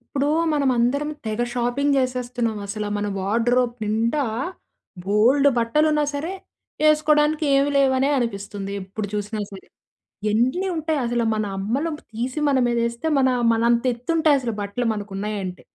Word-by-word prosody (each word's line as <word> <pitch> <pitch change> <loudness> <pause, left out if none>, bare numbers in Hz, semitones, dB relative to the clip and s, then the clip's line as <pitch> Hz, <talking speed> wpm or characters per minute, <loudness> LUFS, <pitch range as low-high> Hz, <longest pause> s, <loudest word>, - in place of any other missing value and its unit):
ఇప్పుడూ 280 +1 +1 0.2
మనమందరం 275 0 +1 0.2
తెగ 215 +1 -2
షాపింగ్ 245 +4 0
చేసేస్తున్నాం 245 -3 -1
అసల. 210 +1 -4
మన 205 0 -2
వార్డ్‌రోప్ 235 +5 +1
నిండా 225 +7 0 0.8
బోలుడు 245 +8 +4
బట్టలున్నా 300 +6 +2
సరే, 300 +6 -4 0.6
ఏసుకోడానికి 305 0 +3
ఏమీ 275 +1 +3
లేవనే 270 0 +3
అనిపిస్తుంది 200 -4 -3
ఎప్పుడు 195 +3 -5
చూసినా 210 +1 -3
సరే. 195 -1 -11 0.6
ఎన్ని 255 - +1
ఉంటాయి 315 -1 -1
అసల, 240 0 0
మన 215 - -1
అమ్మలు 250 +12 -1 0.2
తీసి 250 +6 -3
మన 280 -2 +3
మీద 235 0 0
ఏస్తే, 235 +6 -5
మనా 260 -1 +3 0.2
మనంత 235 +1 +2
ఎత్తు 235 +4 -16
ఉంటాయి 310 -3 +4
అసలు 240 -3 -3
బట్టలు 205 +4 -2
మనకు 205 -1 -6
ఉన్నాయంటే. 195 -3 -4
240 Hz, 135 wpm, -23 LUFS, 215-280 Hz, 0.8 s, బోలుడు